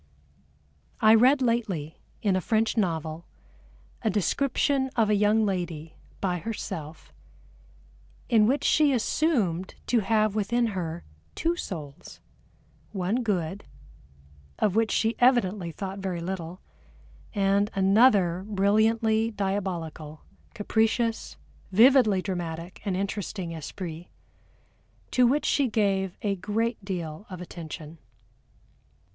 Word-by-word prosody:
I 220 0 +6
read 260 +5 +5
lately, 205 -11 -1 0.2
in 200 -3 +2
a 185 - 0
French 220 +4 +1
novel, 165 -5 -1 0.8
a 220 - +1
description 265 - +1
of 220 -3 +2
a - - +4
young 210 +2 +3
lady, 170 -5 -3 0.2
by 180 -2 -1
herself, 165 -7 -6 1.1
in 220 -3 +4
which 275 +4 +1
she 300 -3 +4
assumed 220 - 0
to 240 - +2
have 215 0 +1
within 235 +3 +1
her 170 -2 -4 0.3
two 335 +1 0
souls, 155 - -8 0.7
one 200 +5 -1
good, 195 -4 -2 0.9
of 210 -3 +1
which 225 -1 +2
she 225 +3 +1
evidently 210 -8 +2
thought 195 +3 -6
very 190 -3 -3
little, 175 0 -5 0.7
and 200 +1 +2
another 195 -3 +4
brilliantly 220 +2 +2
diabolical, 180 -7 -4 0.3
capricious, 225 +2 0 0.3
vividly 220 -3 +5
dramatic 175 -2 -5
and 190 -3 -1
interesting 195 -2 -4
esprit 165 +1 -7 1.0
to 250 -1 +4
which 285 +5 +1
she 280 -2 +2
gave 195 -4 0
a 200 -2 0
great 220 +4 -2
deal 180 -1 -5
of 185 -2 -7
attention. 165 -2 -9
200 Hz, 110 wpm, -26 LUFS, 175-225 Hz, 1.1 s, I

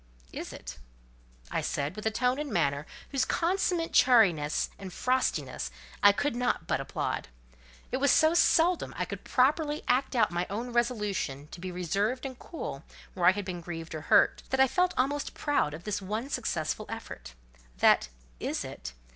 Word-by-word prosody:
"Is - - -6
it?" - - -9 0.7
I - - 0
said, 145 +2 -2
with 215 +1 -3
a - - +4
tone 250 +4 0
and 295 -3 -4
manner 145 -5 0 0.2
whose 275 -2 +1
consummate 345 +1 0
chariness 180 - +4
and 190 -1 -7
frostiness 255 +7 -1 0.3
I 205 - +8
could 260 +5 -1
not 250 0 0
but - - 0
applaud. - - -3 0.6
It 255 - 0
was 280 +1 +2
so 315 0 +5
seldom 345 0 +3
I - - 0
could - - -7
properly 295 +3 +2
act 260 +2 +1
out 220 -5 +3
my 175 +1 -1
own 235 +5 -4
resolution 210 - -1
to 170 - -10
be 185 0 -4
reserved 200 - -1
and 260 -2 -6
cool 155 - -6 0.3
where 175 -2 +2
I - - +9
had 200 +1 -4
been 180 -2 -5
grieved 165 -1 -7
or 155 - -4
hurt, - - +4
that 265 - 0
I 265 - +7
felt 360 +6 +1
almost 285 +3 0
proud 290 - +1
of 165 - -11
this 205 0 -2
one 215 +7 -3
successful 170 - -2
effort. - - -8 0.4
That - - +4 0.3
"Is - - -2
it?" - - -8
225 Hz, 175 wpm, -29 LUFS, 175-265 Hz, 0.7 s, I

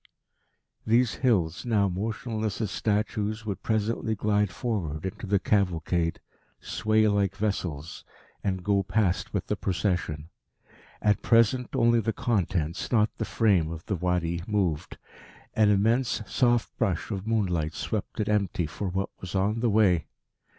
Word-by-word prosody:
These 115 +1 +3
hills, 90 -9 +2
now 105 -5 +2
motionless 110 +2 -3
as 110 -4 -2
statues, 105 +1 -1
would 100 -3 -4
presently 110 0 0
glide 105 -1 +1
forward 90 - -3
into 95 +2 -5
the 100 +1 +3
cavalcade, 90 -4 0 0.4
sway 110 0 +1
like 100 -2 +1
vessels, 85 -7 -3 0.4
and 95 -2 -1
go 100 0 +2
past 95 0 0
with - - -2
the - - -1
procession. 90 -5 -2 0.7
At 105 -1 +3
present 120 +3 +3
only 120 -2 +4
the 110 0 -1
contents, 90 -8 -1
not 110 -3 +2
the 110 - -1
frame, 100 -10 +2
of 85 0 -7
the 100 - -1
Wadi 85 -1 -1
moved. 95 -8 -1 0.6
An 110 -1 +4
immense 110 +4 +2
soft 120 -1 +1
brush 100 -6 0
of 100 0 -4
moonlight 90 -8 0
swept - - -4
it 105 - 0
empty 100 -5 +1
for 85 +6 -4
what 95 +2 -2
was 95 +1 -6
on 100 +4 +1
the 120 0 +2
way.... 100 -6 +3
100 Hz, 145 wpm, -27 LUFS, 90-110 Hz, 0.7 s, only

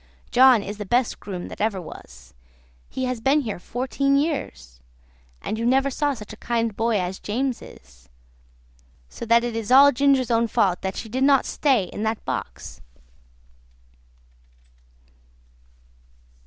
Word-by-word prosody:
John 250 -3 +6
is 205 +1 -7
the 210 - -4
best 245 +3 +1
groom 185 -3 -6
that - - -8
ever 210 -3 0
was; 65 - -12 0.6
he 260 - -3
has 250 -2 -3
been 275 +5 +3
here 215 -8 -5
fourteen 265 +6 -1
years; 65 - -3 0.6
and 220 - -3
you - - -2
never 270 +2 +2
saw 290 +1 -1
such 210 -3 -10
a - - -12
kind 230 -3 -2
boy 225 -1 +1
as 180 +1 -4
James 250 +4 -2
is; - - -16 1.0
so 235 - -8
that 235 +1 +4
it 240 -1 -3
is 225 0 -4
all 280 +2 +8
Ginger's 270 -1 +2
own 230 0 +2
fault 190 -4 +1
that 190 0 -3
she 230 - -6
did 255 +4 -2
not 275 -1 +4
stay 265 -8 +1
in 185 - -7
that 220 0 -2
box." - - -6
230 Hz, 150 wpm, -23 LUFS, 205-265 Hz, 1.0 s, all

